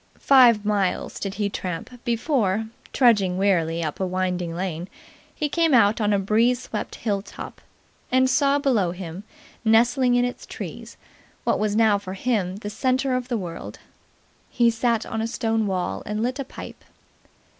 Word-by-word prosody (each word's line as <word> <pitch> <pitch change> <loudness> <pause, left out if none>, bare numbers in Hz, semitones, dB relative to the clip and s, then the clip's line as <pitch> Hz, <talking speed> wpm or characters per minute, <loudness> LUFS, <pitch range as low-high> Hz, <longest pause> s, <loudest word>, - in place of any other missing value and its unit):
Five 240 -6 +5
miles 205 -3 -1
did 195 -1 -4
he 205 -1 0
tramp 180 -2 -5
before, 225 - 0 0.3
trudging 205 -8 +3
wearily 170 -4 +1
up 155 -2 -4
a 190 - 0
winding 180 -2 -2
lane, 175 -1 -3 0.5
he 300 - -1
came 325 -1 +2
out 215 -1 +4
on 210 0 +2
a 200 - +3
breeze 225 +5 +2
swept 215 - -5
hill 205 -3 -1
top, - - -10 0.5
and 260 0 +4
saw 280 +1 +3
below 250 - +1
him, 180 +1 -7 0.4
nestling 245 +3 +4
in 245 0 +3
its 245 - -6
trees, - - -8 0.5
what - - +1
was 210 -1 0
now 215 -2 +4
for 190 -1 -7
him 195 -5 -1
the 205 +1 -6
centre 260 +2 0
of 250 -1 -2
the 245 -3 -1
world. 175 -5 -7 0.7
He 235 -2 +3
sat 230 -1 0
on 225 - -3
a 225 - -1
stone 225 -2 -1
wall 180 - -2
and 210 +2 -2
lit 255 +3 -2
a 275 - -3
pipe. - - -10
215 Hz, 165 wpm, -24 LUFS, 190-245 Hz, 0.7 s, Five